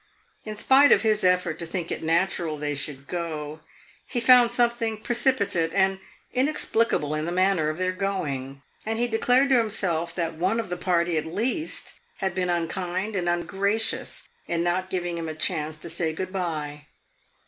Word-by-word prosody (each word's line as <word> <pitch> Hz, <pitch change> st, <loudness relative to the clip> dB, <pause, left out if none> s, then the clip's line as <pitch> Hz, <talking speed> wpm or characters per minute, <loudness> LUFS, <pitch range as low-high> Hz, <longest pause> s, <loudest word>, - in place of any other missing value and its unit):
In 215 Hz, -1 st, -5 dB
spite 270 Hz, +6 st, +5 dB
of -, -, +5 dB
his 215 Hz, -1 st, +2 dB
effort 180 Hz, -3 st, +2 dB
to 170 Hz, -, -5 dB
think 170 Hz, 0 st, -4 dB
it -, -, -3 dB
natural 165 Hz, -1 st, 0 dB
they 145 Hz, 0 st, -2 dB
should 140 Hz, -1 st, -5 dB
go, 155 Hz, -3 st, -4 dB, 0.5 s
he 245 Hz, -, -1 dB
found 240 Hz, 0 st, +6 dB
something 235 Hz, -2 st, +1 dB
precipitate 225 Hz, -9 st, +1 dB
and 190 Hz, 0 st, +3 dB, 0.3 s
inexplicable 230 Hz, -, +1 dB
in 155 Hz, 0 st, -1 dB
the 170 Hz, -, -2 dB
manner 185 Hz, -3 st, +2 dB
of 155 Hz, -, -4 dB
their 185 Hz, 0 st, 0 dB
going, 145 Hz, -9 st, -3 dB, 0.2 s
and 220 Hz, +1 st, -2 dB
he 240 Hz, +1 st, +2 dB
declared 250 Hz, +4 st, +3 dB
to 260 Hz, -2 st, +5 dB
himself 175 Hz, -7 st, -1 dB
that 165 Hz, -2 st, -1 dB
one 185 Hz, +8 st, 0 dB
of 225 Hz, -5 st, -3 dB
the 180 Hz, -, -2 dB
party, 175 Hz, -2 st, +1 dB
at -, -, -6 dB
least, 240 Hz, -, -3 dB, 0.2 s
had 190 Hz, -2 st, -1 dB
been 180 Hz, 0 st, -1 dB
unkind 180 Hz, +4 st, -2 dB
and 175 Hz, -2 st, 0 dB
ungracious 200 Hz, -, -1 dB, 0.2 s
in 170 Hz, 0 st, 0 dB
not 185 Hz, +2 st, 0 dB
giving 175 Hz, -2 st, -2 dB
him 165 Hz, -1 st, -4 dB
a 155 Hz, -, -5 dB
chance 155 Hz, -2 st, -1 dB
to 155 Hz, -, -9 dB
say 165 Hz, -1 st, -2 dB
good 185 Hz, +3 st, -5 dB
bye. 150 Hz, -5 st, -4 dB
180 Hz, 175 wpm, -25 LUFS, 165-220 Hz, 0.5 s, found